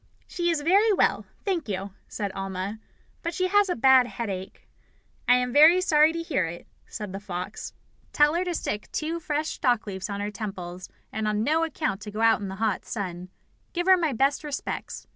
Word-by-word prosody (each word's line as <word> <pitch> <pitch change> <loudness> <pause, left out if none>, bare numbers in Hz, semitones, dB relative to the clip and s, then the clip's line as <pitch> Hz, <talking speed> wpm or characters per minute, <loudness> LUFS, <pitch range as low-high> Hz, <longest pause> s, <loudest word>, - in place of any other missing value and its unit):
"She 345 -1 -1
is 330 -3 +1
very 395 +8 +4
well, 395 - +2 0.2
thank 350 - -1
you," 195 0 -3 0.2
said 205 -3 -4
Alma, 195 +2 -4 0.4
"but 335 -1 -3
she 370 0 0
has 410 0 +4
a 355 - +1
bad 260 0 +6
headache." 195 -5 -6 0.6
"I 245 - +7
am 250 -1 0
very 315 +5 +8
sorry 310 -3 +4
to 335 0 -4
hear 310 - 0
it," 170 +1 -8 0.2
said 210 -3 -6
the 195 - -4
fox. 190 0 -6 0.4
"Tell 295 +1 +4
her 345 +2 +1
to 350 -1 -2
stick 210 -8 -4
two 325 +2 -2
fresh 305 -1 -2
dock 245 -5 +2
leaves 190 -2 -5
on 200 0 -3
her 205 +1 -3
temples, 185 -4 -6 0.2
and 220 -1 -1
on 210 0 0
no 315 +6 +2
account 220 -10 -2
to 210 - -7
go 215 +2 -4
out 225 -1 +4
in 200 - -3
the 190 - -5
hot 210 -2 -1
sun. 180 -3 -5 0.4
Give 350 0 -1
her 380 0 +7
my 330 -5 0
best 275 +5 +1
respects. 295 -2 -5
245 Hz, 200 wpm, -26 LUFS, 200-325 Hz, 0.6 s, very